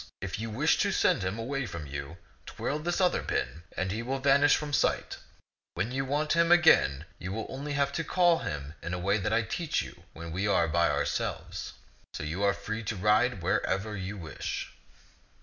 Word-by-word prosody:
If 95 +1 -4
you 115 +1 -3
wish 110 - +2
to - - +2
send - - +3
him 95 +3 -2
away 130 +3 -2
from 85 -5 -6
you, 70 +4 -6 0.3
twirl 150 - -3
this 175 +4 -1
other 180 -1 +3
pin, 65 +6 -2 0.2
and 95 0 -1
he 110 +3 -2
will 130 +3 -2
vanish 140 +2 +5
from 150 -1 -4
sight. - - +1 0.6
When 95 +7 -1
you 135 +1 -1
want 150 +3 0
him 170 0 +3
again, 160 - +5
you 95 +4 -4
have 110 - -3
only 145 +2 -4
to 140 +3 0
call 175 +1 +3
him 75 -1 -5
in 85 - -3
a - - -3
way 100 +4 +1
that 95 - -1
I 115 +1 +3
will - - -6
teach 165 +5 -1
you - - -11
when 85 0 -7
we 95 +5 -1
are 85 -4 +3
by 85 +1 +2
ourselves. - - -2 0.4
So - - -4
are - - -3
you 100 +5 +1
free 110 +3 -4
to 110 - -2
ride 105 +1 +2
wherever 100 +3 0
you 100 +1 -5
wish." 80 -6 -5
105 Hz, 200 wpm, -29 LUFS, 90-140 Hz, 0.6 s, vanish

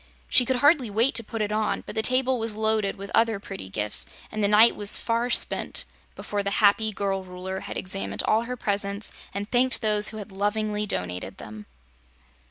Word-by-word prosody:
She 250 - +5
could 260 - 0
hardly 285 -2 +3
wait 225 +6 +2
to 230 0 -1
put 225 0 -4
it 210 - -3
on, 215 0 -1
but - - -7
the 220 - 0
table 255 +2 +3
was 225 -1 -1
loaded 220 -2 0
with 200 0 -8
other 225 -3 +2
pretty 195 - -8
gifts 105 +2 +1 0.2
and 215 -1 -3
the - - +4
night 215 +3 +5
was 205 -1 +5
far 230 +1 -1
spent - - 0 0.3
before 205 -1 -4
the 200 - -2
happy 215 +1 +3
girl 195 -1 -2
Ruler 185 +1 -6
had - - -7
examined 190 +1 -4
all 220 +2 +1
her 250 +1 -5
presents 200 -1 -2 0.2
and 200 +1 -5
thanked 255 +1 +2
those 210 -1 +3
who 220 - -9
had 210 -1 -8
lovingly 210 +1 -1
donated 90 - -4
them. 105 0 -10
210 Hz, 195 wpm, -25 LUFS, 200-225 Hz, 0.3 s, She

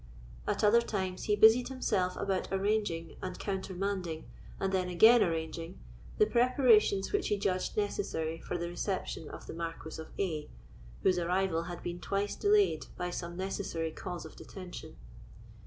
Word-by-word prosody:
At - - 0
other 220 +3 +6
times 190 -5 -3
he 210 - +3
busied 220 +4 +7
himself 205 -8 0
about 195 -2 -1
arranging, 195 -4 0
and 185 -1 -4
countermanding, 190 -3 -3 0.3
and 195 0 -1
then 185 -1 +1
again 220 +7 +7
arranging, 165 +1 -2 0.4
the 425 - +6
preparations 235 - +4
which 410 -2 +1
he 210 - +1
judged 185 -1 -1
necessary 165 -6 -1
for 180 - -3
the 170 0 -3
reception 175 -3 -3
of - - -9
the - - -7
Marquis 165 -1 -5
of 160 - -9
A——, 160 -6 -2 0.5
whose 185 -1 +4
arrival 175 -1 +1
had 175 -1 -7
been 175 0 -4
twice 200 +2 -1
delayed 410 -1 +3
by 180 0 -2
some 175 0 -5
necessary 185 -4 -2
cause 175 0 -6
of 160 - -11
detention. 185 -2 -9
190 Hz, 155 wpm, -32 LUFS, 170-205 Hz, 0.5 s, busied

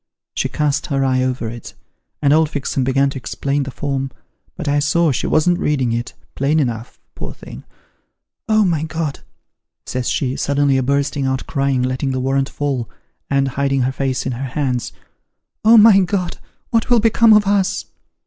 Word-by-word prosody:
She - - -1
cast 150 -2 -1
her 135 -2 0
eye 130 -1 +2
over 130 -2 -1
it, 115 0 -8 0.5
and 140 0 +4
old 160 0 +3
Fixem 140 -2 -2
began 135 +2 +2
to 135 - -6
explain 140 +3 -2
the 135 - -4
form, 135 0 -3 0.5
but 170 -4 -6
I 145 +1 +2
saw 155 +2 +2
she 125 - -2
wasn't 175 +3 +2
reading 135 -8 0
it, 120 +1 -4 0.2
plain 145 +4 +1
enough, 120 -4 -3
poor - - -7
thing. - - -11 0.4
' 65 - -32
Oh, 215 -1 +4
my 165 -5 +1
God! 160 -2 -3 0.3
' - - -63
says 125 -1 -2
she, 130 -3 -1
suddenly 140 -1 +1
a - - +2
bursting 140 +1 0
out 130 -1 -2
crying, 135 -2 0
letting 130 +2 -1
the 130 - -1
warrant 135 +1 0
fall, 135 -5 -3 0.4
and 135 -1 +1
hiding 135 0 0
her 130 - 0
face 130 -1 -2
in 130 - -1
her 125 +3 -4
hands. 130 -2 -2 0.4
' - - -58
Oh, 225 +2 +7
my 210 -2 +8
God! 180 -1 -1 0.3
what 230 0 +1
will 240 -1 +5
become 225 +1 +4
ot 210 -1 +5
us 195 -1 +1
140 Hz, 185 wpm, -19 LUFS, 130-160 Hz, 0.5 s, my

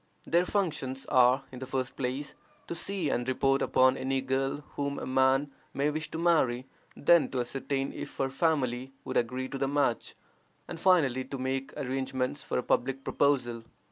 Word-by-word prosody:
Their 170 +2 +3
functions 150 -10 -2
are, 130 +1 +5
in 130 - -8
the 130 - -6
first 130 -1 -2
place, 135 +2 -3 0.3
to - - -5
see 170 -3 -1
and 120 +1 -1
report 135 +1 +2
upon 130 +1 +4
any 135 0 0
girl 135 +2 -1
whom 140 0 -2
a - - -4
man 130 +2 +2 0.2
may 145 +2 +1
wish 155 +1 -4
to - - -5
marry; 145 -8 +2 0.3
then 170 +3 +5
to 130 - -1
ascertain 135 +2 -2
if - - -7
her 135 -1 0
family 135 -4 0
would 130 - -4
agree 125 +2 -1
to 135 - -5
the 135 - +1
match, 140 -4 0 0.5
and, - - -7
finally, 150 -9 +3
to 135 - -6
make 130 +1 -2
arrangements 130 0 -2
for - - -3
a 125 - 0
public 135 +3 0
proposal. 125 -6 +1
135 Hz, 175 wpm, -29 LUFS, 130-145 Hz, 0.5 s, are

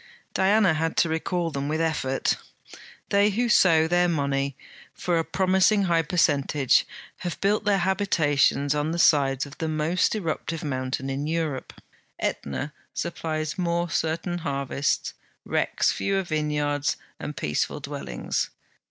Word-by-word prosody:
Diana 195 -1 +4
had 160 +1 -1
to 170 - +3
recall 165 +1 -1
them 140 -1 -3
with 155 +2 -1
effort. 150 -5 0 0.7
They 200 +1 +4
who 235 +4 0
sow 160 -7 +5
their 175 +1 +3
money 140 -3 -1 0.4
for 175 -2 0
a - - +1
promising 190 +3 +3
high 170 -3 +3
percentage 145 -5 +2 0.3
have 175 -2 -5
built 210 +2 +1
their 205 -1 +3
habitations 160 -7 +2
on 150 +2 -1
the - - -2
sides 140 -5 +3
of 145 +2 -13
the 160 - -1
most 155 +6 +1
eruptive 165 -4 -3
mountain 130 -2 -2
in 140 +2 -3
Europe. 160 -5 -3 0.4
AEtna 130 - -3 0.2
supplies 155 -1 -3
more 170 -1 0
certain 165 +2 -1
harvests, 140 -2 -1 0.3
wrecks - - +1
fewer 195 -1 0
vineyards 150 -3 -1 0.2
and 150 - -6
peaceful 75 - -1
dwellings. 60 -3 -3
160 Hz, 135 wpm, -25 LUFS, 145-175 Hz, 0.7 s, sow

